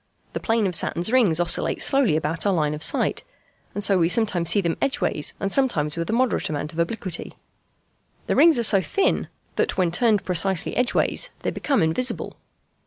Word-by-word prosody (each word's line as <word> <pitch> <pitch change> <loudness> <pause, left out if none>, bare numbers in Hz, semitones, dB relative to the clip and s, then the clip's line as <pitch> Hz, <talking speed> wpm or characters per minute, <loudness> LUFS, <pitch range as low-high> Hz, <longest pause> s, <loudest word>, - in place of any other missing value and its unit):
The - - -3
plane 225 -2 0
of 185 - -1
Saturn's 170 +4 +1
rings 215 -11 +3
oscillates 175 0 0
slowly 270 - +2
about 160 +1 -2
our 200 - +2
line 150 -4 0
of 150 - -7
sight, - - +1 0.5
and 205 - -3
so 195 -2 +3
we 165 -1 +2
sometimes 185 -5 +1
see 205 - +3
them 170 -4 -1
edgeways 155 - -1
and 195 0 -2
sometimes 155 - +1
with 170 +2 -4
a - - 0
moderate 250 +2 0
amount 150 +1 -4
of 165 - -7
obliquity. 185 0 -3 0.9
The - - -1
rings 330 -3 +5
are 235 - 0
so 200 -3 +3
thin 390 - 0 0.3
that, - - 0
when 180 -3 +1
turned 215 +2 +1
precisely 185 0 -1
edgeways, 250 0 0
they - - -2
become 275 - 0
invisible. 165 +11 -1
190 Hz, 185 wpm, -23 LUFS, 165-230 Hz, 0.9 s, rings